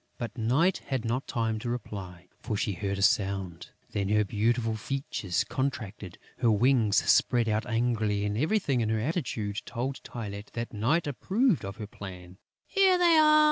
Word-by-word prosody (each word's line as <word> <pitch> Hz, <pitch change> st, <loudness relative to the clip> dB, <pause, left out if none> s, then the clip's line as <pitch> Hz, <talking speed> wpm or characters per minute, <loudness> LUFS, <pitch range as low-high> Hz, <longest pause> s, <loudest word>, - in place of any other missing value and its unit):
But 120 Hz, -3 st, -5 dB
Night 135 Hz, +11 st, +2 dB
had 130 Hz, -4 st, -2 dB
not 125 Hz, +4 st, -1 dB
time 110 Hz, -2 st, -1 dB
to 120 Hz, +2 st, -4 dB
reply, 95 Hz, -7 st, -6 dB
for 110 Hz, -4 st, -3 dB
she 100 Hz, -, 0 dB
heard 100 Hz, +1 st, -3 dB
a 100 Hz, -, -1 dB
sound. 95 Hz, -4 st, 0 dB, 0.2 s
Then 100 Hz, -1 st, -1 dB
her 105 Hz, 0 st, +3 dB
beautiful 115 Hz, +3 st, 0 dB
features 110 Hz, -5 st, -2 dB
contracted; 105 Hz, -9 st, -4 dB, 0.2 s
her 120 Hz, -, +3 dB
wings 110 Hz, -1 st, +3 dB
spread 120 Hz, -2 st, +4 dB
out 110 Hz, +2 st, 0 dB
angrily; 110 Hz, -3 st, 0 dB
and 105 Hz, 0 st, -1 dB
everything 145 Hz, -, +1 dB
in 110 Hz, -, 0 dB
her 110 Hz, 0 st, +1 dB
attitude 115 Hz, -, -2 dB
told 130 Hz, +2 st, -4 dB
Tylette 105 Hz, -3 st, -7 dB
that 115 Hz, 0 st, -4 dB
Night 125 Hz, +11 st, +1 dB
approved 195 Hz, -, +1 dB
of 100 Hz, 0 st, -5 dB
her 110 Hz, -, -5 dB
plan. 95 Hz, -3 st, -10 dB, 0.3 s
"Here 385 Hz, -2 st, +4 dB
they 345 Hz, -2 st, +5 dB
are!" 305 Hz, 0 st, +6 dB
115 Hz, 170 wpm, -28 LUFS, 100-130 Hz, 0.3 s, are